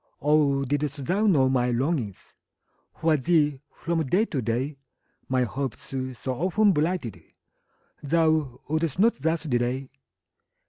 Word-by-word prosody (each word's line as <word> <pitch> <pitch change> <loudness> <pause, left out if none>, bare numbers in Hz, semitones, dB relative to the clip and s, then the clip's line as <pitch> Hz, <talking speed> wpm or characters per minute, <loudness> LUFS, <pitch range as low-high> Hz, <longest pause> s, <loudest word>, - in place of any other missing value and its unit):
Oh, 145 -2 +3
didst 145 0 -2
thou 200 +7 +1
know 140 -9 +4
my 125 -2 +1
longings 125 - -2 0.6
For 160 -1 +2
thee, 150 -1 +2
from 170 -1 -2
day 180 - +2
to 140 - -3
day, 125 +5 -2 0.5
My 130 -1 +2
hopes, 130 +3 -5 0.3
so 130 - -2
often 190 - +2
blighted, 155 - -1 0.8
Thou 155 -4 +1
wouldst 160 0 -1
not 215 -6 +3
thus 160 +1 0
delay! 130 -1 -1
145 Hz, 125 wpm, -26 LUFS, 130-165 Hz, 0.8 s, know